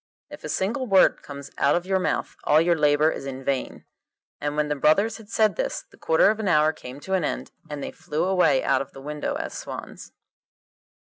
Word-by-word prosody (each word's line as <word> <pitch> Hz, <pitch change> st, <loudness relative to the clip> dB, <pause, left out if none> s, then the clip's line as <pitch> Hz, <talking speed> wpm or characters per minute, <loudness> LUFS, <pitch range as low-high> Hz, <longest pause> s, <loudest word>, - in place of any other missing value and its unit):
If -, -, -10 dB
a -, -, -5 dB
single 235 Hz, +7 st, -1 dB
word 195 Hz, -3 st, +4 dB
comes 140 Hz, -1 st, -9 dB
out -, -, +4 dB
of 175 Hz, +1 st, -1 dB
your 190 Hz, 0 st, +1 dB
mouth, 185 Hz, -, -2 dB
all 150 Hz, -, +5 dB
your 170 Hz, +1 st, +3 dB
labour 150 Hz, 0 st, +3 dB
is -, -, -6 dB
vain.' 135 Hz, 0 st, -3 dB, 0.5 s
And 145 Hz, 0 st, -3 dB
when 150 Hz, 0 st, +1 dB
the 150 Hz, -, -1 dB
brothers 180 Hz, +10 st, +2 dB
had 220 Hz, -3 st, -15 dB
said 220 Hz, -1 st, +2 dB
this -, -, -2 dB
the -, -, -22 dB
quarter 160 Hz, +5 st, +3 dB
of 220 Hz, -, -4 dB
an 215 Hz, -, -2 dB
hour 155 Hz, -2 st, +4 dB
came 125 Hz, -1 st, -10 dB
to 190 Hz, -, -4 dB
an 185 Hz, -3 st, +2 dB
end, -, -, -3 dB, 0.2 s
and 145 Hz, -2 st, -5 dB
they -, -, -5 dB
flew 155 Hz, +2 st, -3 dB
away 180 Hz, -8 st, +3 dB
out 135 Hz, -1 st, +2 dB
of 135 Hz, -, -8 dB
the 135 Hz, -, -11 dB
window 150 Hz, -, -3 dB
as 320 Hz, +1 st, -4 dB
swans. -, -, -8 dB
160 Hz, 215 wpm, -25 LUFS, 145-195 Hz, 0.5 s, all